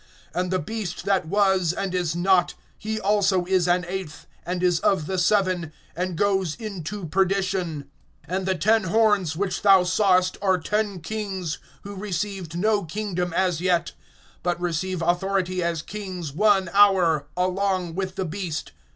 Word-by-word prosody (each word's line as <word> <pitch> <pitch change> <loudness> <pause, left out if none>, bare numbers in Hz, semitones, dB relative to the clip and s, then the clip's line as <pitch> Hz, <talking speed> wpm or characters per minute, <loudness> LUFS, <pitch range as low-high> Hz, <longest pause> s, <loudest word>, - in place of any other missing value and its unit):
(11)And 180 0 -1
the 185 - +1
beast 195 +1 -5
that 195 -5 +1
was, 190 -2 +2
and 195 0 -3
is 175 -3 -1
not, 175 0 +2 0.2
he 220 +1 -4
also 195 -3 +2
is 185 -1 +2
an 180 0 +2
eighth, 180 -5 -6 0.2
and 180 0 -2
is 175 -2 +3
of 190 -6 +1
the 185 +2 -2
seven, 185 -3 +1 0.2
and 180 +1 -2
goes 190 -5 +1
into 205 -3 -6
perdition. 185 -4 0 0.4
(12)And 185 +3 -2
the 190 0 +1
ten 220 +3 +2
horns 205 -4 +2
which 185 +1 -2
thou 195 -3 +6
sawest 185 0 +2
are 190 -2 +3
ten 205 +1 -2
kings, 190 -5 -4 0.2
who 200 - -7
received 190 -3 -4
no 210 +2 +2
kingdom 180 0 -3
as 180 -2 +1
yet; 175 -2 +1 0.5
but 175 0 -1
receive 175 +1 -2
authority 185 +1 0
as 170 -2 -1
kings 185 -7 -6
one 195 +1 +3
hour, 185 -7 +4
along 185 -1 0
with 190 +1 -3
the 190 -1 -2
beast. 170 -2 -4
185 Hz, 155 wpm, -24 LUFS, 175-195 Hz, 0.5 s, thou